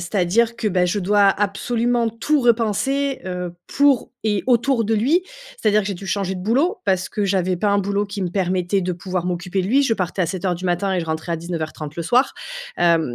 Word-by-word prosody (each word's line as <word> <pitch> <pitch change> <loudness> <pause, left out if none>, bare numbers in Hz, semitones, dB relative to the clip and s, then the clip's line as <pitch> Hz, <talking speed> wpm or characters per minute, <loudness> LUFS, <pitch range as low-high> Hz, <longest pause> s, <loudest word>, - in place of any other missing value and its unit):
c'est-à-dire 205 +6 +1
que, 235 - -3
bah, 180 -3 +2
je 180 +4 0
dois 200 +1 +4
absolument 230 +4 0
tout 275 +6 0
repenser, 245 +4 +1
heu, 180 -1 -4
pour 280 -3 +2
et 210 -2 0
autour 245 -1 +2
de 225 - -1
lui. 275 - +2 0.3
C'est-à-dire 215 - +2
que 195 - -5
j'ai 200 - -2
dû 195 +2 -9
changer 190 -1 -1
de 180 - -6
boulot, 280 - +1
parce 185 -1 +1
que 210 - -2
j'avais 185 -2 +1
pas 205 +3 0
un 200 - +3
boulot 200 +1 0
qui 200 0 -6
me 180 - -1
permettait 185 +1 0
de 180 0 -1
pouvoir 180 0 -3
m'occuper 180 +1 -2
de - - -3
lui. 270 +7 +3
Je 235 -4 +2
partais 185 -1 -3
à 170 - +2
07:00 185 0 -2
du 185 +2 -5
matin 180 +2 0
et 180 - 0
je 165 - -5
rentrais 160 +2 -3
à - - 0
19:30 160 -3 -5
le 170 - -2
soir. 245 - +2 0.4
Hem, 165 -7 +2
195 Hz, 225 wpm, -21 LUFS, 180-230 Hz, 0.4 s, dois